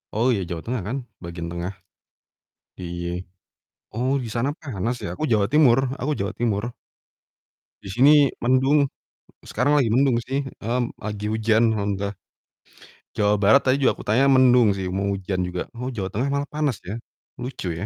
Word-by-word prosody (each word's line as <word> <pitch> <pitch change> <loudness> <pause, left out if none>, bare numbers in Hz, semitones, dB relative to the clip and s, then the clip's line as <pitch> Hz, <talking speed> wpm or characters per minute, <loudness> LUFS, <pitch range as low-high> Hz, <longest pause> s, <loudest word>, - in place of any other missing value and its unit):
Oh, 110 +3 +1
iya, 100 - -1
Jawa 85 -2 -4
Tengah 125 -2 -2
kan, 125 +6 -2 0.3
bagian 85 0 -6
tengah. 85 +3 -4 1.0
Di - - -8 1.1
oh, 125 +5 0
di - - -5
sana 125 +4 +1
panas 120 - -3
ya, - - -4
aku 155 - -5
Jawa 105 -2 +3
Timur 135 -5 +6 0.2
aku 140 +4 0
Jawa 100 +2 -2
Timur. 110 -3 0 1.2
Di - - -9
sini 140 +8 +5 0.2
mendung, 135 +3 +3 0.5
sekarang 145 +6 +1
lagi 130 - +2
mendung 125 +2 +3
sih, 135 +4 -2 0.2
mmm, 120 +1 -2
lagi 105 0 -5
hujan, 110 +1 +3
alhamdulillah. 100 -2 -2 1.1
Jawa 105 0 +3
Barat 105 +8 +5
tadi 130 - +4
juga - - +5
aku - - -11
tanya 120 +6 +2
mendung 125 -5 +5
sih, 95 -1 -4
mau 95 +2 -2
hujan 95 -1 -2
juga. 90 0 -4
Oh, 125 +1 -3
Jawa 95 -5 -3
Tengah 110 +7 -2
malah 140 0 -2
panas, 150 -6 -1
ya? 100 +5 -6 0.4
Lucu, 125 -6 -5
ya. - - -4
115 Hz, 165 wpm, -23 LUFS, 100-130 Hz, 1.2 s, Timur